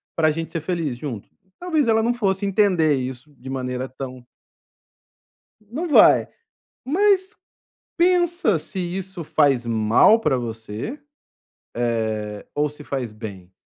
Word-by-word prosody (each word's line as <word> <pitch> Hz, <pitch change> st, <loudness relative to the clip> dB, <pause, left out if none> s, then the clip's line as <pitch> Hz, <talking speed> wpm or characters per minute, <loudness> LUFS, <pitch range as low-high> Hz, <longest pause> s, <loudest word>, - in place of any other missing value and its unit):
pra 155 Hz, -1 st, +3 dB
gente 165 Hz, +1 st, -4 dB
ser 165 Hz, -, -3 dB
feliz 160 Hz, -6 st, -2 dB
junto", 125 Hz, -6 st, -6 dB, 0.3 s
talvez 320 Hz, -7 st, 0 dB
ela 225 Hz, -1 st, +4 dB
não 235 Hz, +2 st, +2 dB
fosse 200 Hz, -4 st, -1 dB
entender 185 Hz, -7 st, +3 dB
isso 130 Hz, +2 st, -6 dB
de 130 Hz, +2 st, -9 dB
maneira 130 Hz, -1 st, -3 dB
tão 130 Hz, -1 st, -8 dB, 1.4 s
não 310 Hz, +10 st, -4 dB
vai. 295 Hz, -, +6 dB, 0.6 s
Mas 385 Hz, +6 st, +2 dB, 0.6 s
pensa 345 Hz, -, +3 dB
se 190 Hz, +5 st, -7 dB
isso 180 Hz, 0 st, -4 dB
faz 140 Hz, -5 st, +2 dB
mal 115 Hz, -, +4 dB
pra 150 Hz, -11 st, +1 dB
você, 115 Hz, -, -6 dB, 1.2 s
eh, 105 Hz, -1 st, -8 dB
ou 150 Hz, +1 st, +1 dB
se 150 Hz, +1 st, -13 dB
faz 130 Hz, -6 st, -4 dB
bem? 100 Hz, -4 st, -9 dB
155 Hz, 125 wpm, -22 LUFS, -, 1.4 s, vai